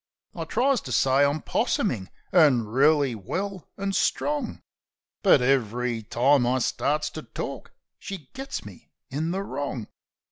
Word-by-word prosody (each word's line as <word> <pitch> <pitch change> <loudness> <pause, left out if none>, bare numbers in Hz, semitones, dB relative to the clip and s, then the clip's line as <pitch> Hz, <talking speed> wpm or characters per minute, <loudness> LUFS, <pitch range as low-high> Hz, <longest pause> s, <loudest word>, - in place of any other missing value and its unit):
I - - -5
tries 265 -1 +2
to 130 - -8
say 135 +4 +4
I'm 145 +2 +1
possumin', 95 -1 0 0.2
an' 145 -10 +5
reely 140 +4 +3
well 185 - -4
an' 195 0 -2
strong; 295 +8 -1 0.6
But 185 - +5
ev'ry 125 -2 +1
time 125 +4 +3
I 125 +1 +2
starts 150 +4 0
to 155 - -6
tork - - -6 0.3
she's 195 -4 -6
got 270 +1 -5
me 100 -4 -13 0.2
in 155 +5 -1
the 190 +3 -2
wrong. 135 - -4
140 Hz, 140 wpm, -26 LUFS, 125-185 Hz, 0.6 s, an